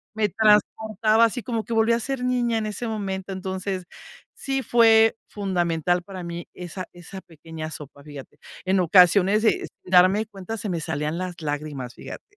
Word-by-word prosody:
me 215 -1 +1
transportaba, 215 +1 +3
así 230 0 -2
como 230 -1 -2
que 235 - -4
volví 225 +1 +3
a 235 - +1
ser 265 +2 -3
niña 245 -2 +1
en 220 - -2
ese 215 +3 -4
momento, 195 -3 -4
entonces, 190 0 -4 0.5
sí 270 -1 -3
fue 225 -2 +5
fundamental 175 -3 0
para 185 -1 -8
mí, 170 0 -6
esa 180 +1 -7
esa 175 +2 -10
pequeña 160 -1 -9
sopa, 140 -2 -10
fíjate. 145 -2 -11 0.3
En 190 +1 +2
ocasiones, 185 +4 +5
eh, - - +2 0.2
darme 185 +4 +4
cuenta 205 +1 -7
se 215 -1 -4
me 170 -2 -2
salían 150 0 -3
las 185 -1 -5
lágrimas, 145 -4 -4
fíjate. - - -9
190 Hz, 165 wpm, -24 LUFS, 175-220 Hz, 0.5 s, fue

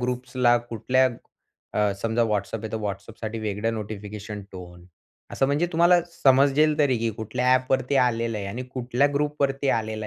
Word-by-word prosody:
ग्रुप्सला 125 0 +1
कुठल्या 125 +3 +1 0.7
अ, 105 -1 +2
समजा 115 +1 +1
WhatsApp 105 +1 -2
आहे, 110 - -5
तर - - -1
WhatsAppसाठी 110 +2 -5
वेगळं 105 +1 -2
नोटिफिकेशन 105 0 -6
टोन 90 -1 -11 0.5
असं 135 - +1
म्हणजे 145 +5 +1
तुम्हाला 175 +2 +5
समजेल 145 +1 +4
तरी 140 -4 +3
की 115 +1 0
कुठल्या 120 +4 0
एप 130 0 -1
वरती 130 +1 +1
आलेलं 115 -3 +1
आहे 100 - -5
आणि 110 +6 -5
कुठल्या 125 +2 +1
ग्रुप 150 +1 -1
वरती 135 0 0
आलेला 110 -1 -2
120 Hz, 160 wpm, -25 LUFS, 105-135 Hz, 0.7 s, तुम्हाला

